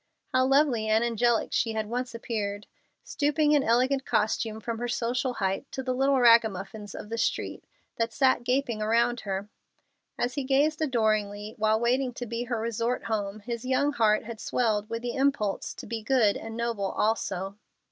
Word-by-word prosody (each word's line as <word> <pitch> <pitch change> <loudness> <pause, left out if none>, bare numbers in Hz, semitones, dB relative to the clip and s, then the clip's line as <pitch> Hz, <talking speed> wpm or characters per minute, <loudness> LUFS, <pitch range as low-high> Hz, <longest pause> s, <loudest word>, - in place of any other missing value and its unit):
How 255 0 +3
lovely 270 -5 +3
and 220 +1 +3
angelic 235 0 +1
she 225 -1 +1
had 220 -1 -1
once 245 +2 -4
appeared, 210 -3 -3 0.4
stooping 295 0 +1
in 295 -1 +5
elegant 260 +3 +2
costume 220 0 0
from 225 +1 -4
her 245 - -2
social 245 +2 -1
height 195 +6 -2
to 265 - -3
the 255 -1 -1
little 270 +1 +2
ragamuffins 215 -3 +3
of 210 - -8
the 230 0 -3
street - - -1 0.3
that 230 0 0
sat 260 +1 +2
gaping 250 -3 0
around 235 +3 +2
her! 195 -1 -4 0.7
As 245 +1 -1
he 280 - -2
gazed 290 +4 +2
adoringly, 215 -6 0
while 215 0 +3
waiting 250 +2 +1
to 245 - -5
be 235 +1 -3
her 240 -2 -2
resort 230 +2 -1
home, 210 -2 -3
his 235 +1 -5
young 265 +3 +1
heart 215 -4 +3
had 225 0 -8
swelled 215 -4 0
with 230 +1 -4
the 240 -1 -2
impulse 270 -7 0
to - - -9
be 230 -1 -4
good 220 -3 +3
and 225 0 -7
noble 230 -4 -1
also. 195 -3 -1
230 Hz, 180 wpm, -27 LUFS, 215-255 Hz, 0.7 s, in